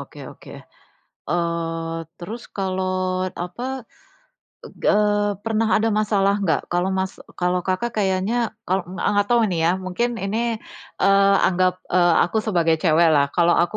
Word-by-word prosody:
oke - - -11
oke. - - -15 0.8
Eee, 165 -1 -2 0.2
terus 215 +7 -7 0.2
kalau 190 -1 -1 0.5
apa 180 +7 -7 1.0
eg - - -15 0.2
eee, 205 -1 +1
pernah 225 0 0
ada 220 - 0
masalah 200 -2 +2
enggak? 160 -6 +1
Kalau 175 +2 +1
Mas 190 0 -1 0.3
kalau 180 0 +1
Kakak 190 +6 -1
kayaknya 190 +2 0 0.3
kalau 185 +1 0
enggak 190 - -5
enggak 205 0 +2
tahu 240 -1 +4
nih 175 - -1
ya, 170 - +4
mungkin 235 +7 -1
ini, 205 +3 -1 0.6
eee, 195 +1 +5
anggap, 185 0 +2 0.2
eee, 175 -2 +4
aku 220 - -1
sebagai 170 -5 +2
cewek 170 0 +4
lah. 140 -1 +4
Kalau 175 0 +4
aku 175 - -2
185 Hz, 150 wpm, -22 LUFS, 175-205 Hz, 1.0 s, eee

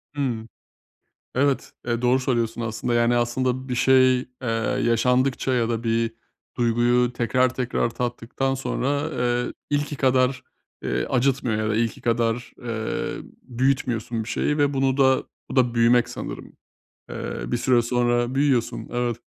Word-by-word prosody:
Hımm. 120 -6 -2 0.9
Evet, 140 +1 +1 0.2
eee, 120 0 0
doğru 125 +1 +3
söylüyorsun 120 -3 -1
aslında. 115 +2 -2
Yani 120 0 +3
aslında 130 +2 -1
bir 125 - -1
şey, 130 0 +5
eee, 125 - -8 0.6
yaşandıkça 125 +3 +2
ya 120 -2 +1
da 115 0 -2
bir 115 0 0 0.4
duyguyu 120 +1 +2
tekrar 125 +2 +1
tekrar 125 -2 -1
tattıktan 120 +2 -2
sonra, 140 +2 -1
eee, 120 0 0 0.2
ilki 145 0 -1
kadar, 130 -1 +2 0.4
eee, - - -1
acıtmıyor 125 -3 +1
ya 110 - -1
da 110 - +1
ilki 115 -1 -1
kadar, 120 0 0
eee, 115 -2 -3 0.2
büyütmüyorsun 120 -3 -1
bir 110 - -8
şeyi 150 - 0
ve 145 -1 +2
bunu 135 0 +1
da 130 -1 +4 0.3
bu - - -5
da 125 -2 +3
büyümek 120 +1 +4
sanırım. 120 - -7 0.5
Eee, - - -5
bir - - +1
süre 125 -2 +3
sonra 120 +1 +1
büyüyorsun, 135 -4 +1
evet. 120 -1 -1
125 Hz, 145 wpm, -24 LUFS, 115-130 Hz, 0.9 s, şey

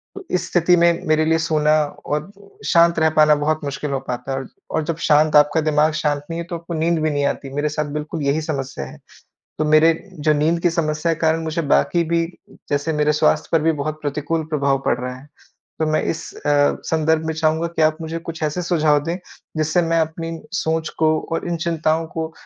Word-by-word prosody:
तो 395 - -8
इस 180 - 0
स्थिति 175 0 +4
में 170 0 +3
मेरे 155 0 +3
लिए 160 +1 +3
सोना 155 -2 +1 0.3
और 150 +5 -3 0.3
शांत 170 0 +4
रह 160 0 +4
पाना 155 -1 +5
बहुत 150 +1 0
मुश्किल 140 +1 -4
हो 135 - 0
पाता 125 +2 -4
है 135 - -1
और 135 - -5 0.2
और 160 - 0
जब 165 +1 -2
शांत 150 0 +4
आपका 150 +2 +5
दिमाग 155 0 +2
शांत 145 -2 0
नहीं 165 - -4
है 170 - -3
तो 175 - -3
आपको 170 +1 -7
नींद 165 +1 +1
भी 155 - +1
नहीं 145 0 0
आती। 140 -1 -2
मेरे 145 +1 0
साथ 150 0 -2
बिल्कुल 150 +1 -4
यही 140 +3 +1
समस्या 135 - -4
है। - - -11 0.6
तो 155 - +1
मेरे 155 +2 +5 0.3
जो 155 +1 +3
नींद 155 +3 +1
की 175 - +3
समस्या 160 0 0
के 160 - -15
कारण 160 0 +2
मुझे 160 +1 -2
बाकी 170 +3 +2
भी 165 0 +3 0.5
जैसे 145 +3 0
मेरे 150 0 +2
स्वास्थ्य 150 0 +2
पर 165 -2 +3
भी 160 +1 +3
बहुत 155 +2 -3
प्रतिकूल 150 +2 -2
प्रभाव 140 -2 +2
पड़ - - +3
रहा 125 0 -4
है। 130 +3 -14 0.5
तो 160 - +2
मैं 155 - +1
इस 165 - -4
अ, - - -10 0.4
संदर्भ 160 0 +1
में 160 - -2
चाहूँगा 160 +1 +1
कि 165 -1 -2
आप 155 0 +3
मुझे 165 +1 -4
कुछ 165 -1 -8
ऐसे 155 +4 -1
सुझाव 155 -4 +2
दें, 170 +1 -2 0.4
जिससे 155 +3 +1
मैं 165 0 +1
अपनी 165 +1 -3
सोच 160 -4 -1
को 160 - +3 0.2
और 165 - -2
इन 170 - -1
चिंताओं 165 -1 0
को 160 0 -5
155 Hz, 220 wpm, -20 LUFS, 150-165 Hz, 0.6 s, पाना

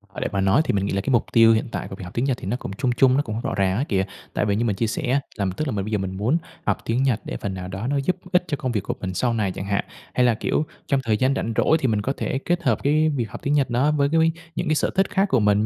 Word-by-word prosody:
À, - - -4
để - - 0
mà 100 - 0
nói 95 +9 +4
thì - - 0
mình 100 0 +1
nghĩ 100 - -2
là 100 - 0
cái 100 - -4
mục 120 -3 +3
tiêu 115 -1 +7
hiện 110 - 0
tại - - -4
của 95 - -7
việc 95 - -9
học 90 - -9
tiếng 120 - 0
Nhật 130 -3 0
thì - - -9
nó 120 +5 -1
cũng 95 - -7
chung 125 - +1
chung, 125 +2 +4
nó - - +4
cũng 110 -6 -5
hông 115 - -4
rõ - - -2
ràng 95 0 +1
á 135 - +1
kìa 95 -2 +1 0.3
tại - - 0
vì 100 -1 +1
như 115 +2 0
mình 105 - 0
chia 115 +3 0
sẻ - - -2
á, 140 - +3 0.2
là 100 - 0
tức 155 - -1
là - - -1
mình 100 -2 -2
bây 110 - -5
giờ 105 - +2
mình 95 -1 -4
muốn 120 +11 +2 0.3
học - - +1
tiếng 120 +4 +1
Nhật 125 -5 +1
để - - -4
phần 100 -2 -4
nào 90 -1 -6
đó 95 +6 -4
nó 145 - +1
giúp 140 +6 +1 0.2
ích 180 -1 +4
cho 150 -3 -1
công 130 -4 -2
việc 105 -4 0
của - - -2
mình 95 -1 -4
sau 120 +5 +1
này 105 -4 0
chẳng 95 - -6
hạn. 100 0 0 0.3
Hay 125 - +3
là, 120 - +4
kiểu, 150 +7 0 0.2
trong 140 - +2
thời 110 -2 +1
gian 130 +3 +2
rảnh 115 -3 -2
rỗi 160 - +4
thì 135 - +1
mình 105 -2 +1
có 135 +6 -1
thể 135 - -1
kết 175 0 0
hợp - - +1
cái 155 +2 +3
việc 120 -7 -2
học - - -8
tiếng 145 - +1
Nhật 145 -2 +2
đó 130 +5 +2
với 140 -2 +2
cái 165 - +2
mấy 165 0 +4 0.2
những 175 - -2
cái 155 - +2
sở - - +1
thích 195 0 +2
khác 195 0 +2
của 130 - +3
mình 105 0 +3
120 Hz, 360 wpm, -23 LUFS, 100-140 Hz, 0.3 s, tiêu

